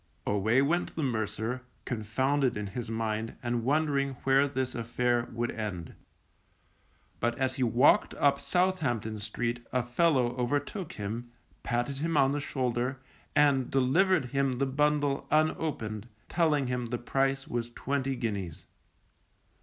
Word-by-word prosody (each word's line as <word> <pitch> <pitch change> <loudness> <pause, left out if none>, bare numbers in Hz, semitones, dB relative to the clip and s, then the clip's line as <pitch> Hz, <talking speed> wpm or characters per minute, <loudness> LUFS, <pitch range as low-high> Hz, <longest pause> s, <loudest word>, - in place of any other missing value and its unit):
_ - - +2
Away 110 +6 +3
went 170 +5 0
the 160 - -1
mercer, 110 0 -2 0.2
confounded 130 +4 0
in 105 - -3
his 110 +3 -5
mind, 110 0 -2
and 120 -1 -1
wondering 140 0 +1
where 135 +1 +4
this 130 -2 -2
affair 120 +1 0
would 120 +1 -2
end. 100 -7 -5 1.3
But 120 +1 0
as 130 -1 0
he - - -3
walked 125 +3 +4
up 140 -1 +3
Southampton 140 - 0
Street 120 +3 -3
a 125 0 +1
fellow 125 -1 +2
overtook 145 - -2
him, 110 +4 -5 0.3
patted 120 +3 -1
him 165 +1 0
on 135 -1 +5
the 145 - -1
shoulder, 130 -2 -1 0.4
and 140 -3 +4
delivered 135 +6 +3
him 135 -2 +1
the 140 - +1
bundle 145 0 +1
unopened, 145 -9 0 0.2
telling 155 -5 +2
him 125 -1 -2
the 120 +1 -2
price 135 +2 0
was 120 0 -3
twenty 135 +2 -2
guineas. 100 -9 -4
125 Hz, 140 wpm, -29 LUFS, 115-140 Hz, 1.3 s, on